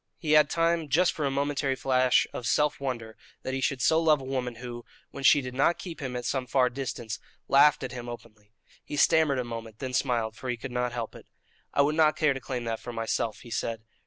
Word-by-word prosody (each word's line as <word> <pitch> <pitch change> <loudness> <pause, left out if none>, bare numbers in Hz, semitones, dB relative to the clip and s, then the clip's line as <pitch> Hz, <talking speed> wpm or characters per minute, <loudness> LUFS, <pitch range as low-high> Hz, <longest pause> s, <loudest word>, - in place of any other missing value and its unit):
He 155 -4 -3
had 155 0 +6
time 165 -2 +1
just 175 +6 +3
for 150 - -3
a - - +1
momentary 140 0 0
flash 130 -1 +3
of 120 - -4
self 150 +6 +2
wonder 120 -5 -4 0.3
that 130 - -3
he 135 - -2
should 130 -2 0
so 160 0 +4
love 155 -3 +4
a - - -9
woman 130 -2 -3
who, 120 0 -8 0.3
when 140 - -8
she 145 +2 +6
did 125 -1 -6
not 140 +6 +2
keep 170 -3 -8
him 130 -2 -4
at 125 -1 -4
some 130 0 -1
far 125 0 +2
distance, 120 -5 -5 0.3
laughed 145 +1 +5
at 130 - -4
him 120 -2 -7
openly. 105 -3 -11 0.3
He - - -6
stammered 155 -2 +4
a 125 - 0
moment, 115 -2 -7
then 130 +1 -5
smiled, 115 -5 0
for 130 - -7
he 120 - -1
could 125 +3 -7
not 125 0 -1
help 120 -2 -4
it. - - -14 0.4
"I 140 - +3
would 145 +2 +1
not 155 -1 +4
care 155 -3 +3
to 135 - -5
claim 125 -1 -4
that 115 -1 -3
for 120 - -7
myself," 115 -1 -2
he 120 - -12
said. 115 -1 -3
130 Hz, 240 wpm, -28 LUFS, 120-145 Hz, 0.4 s, had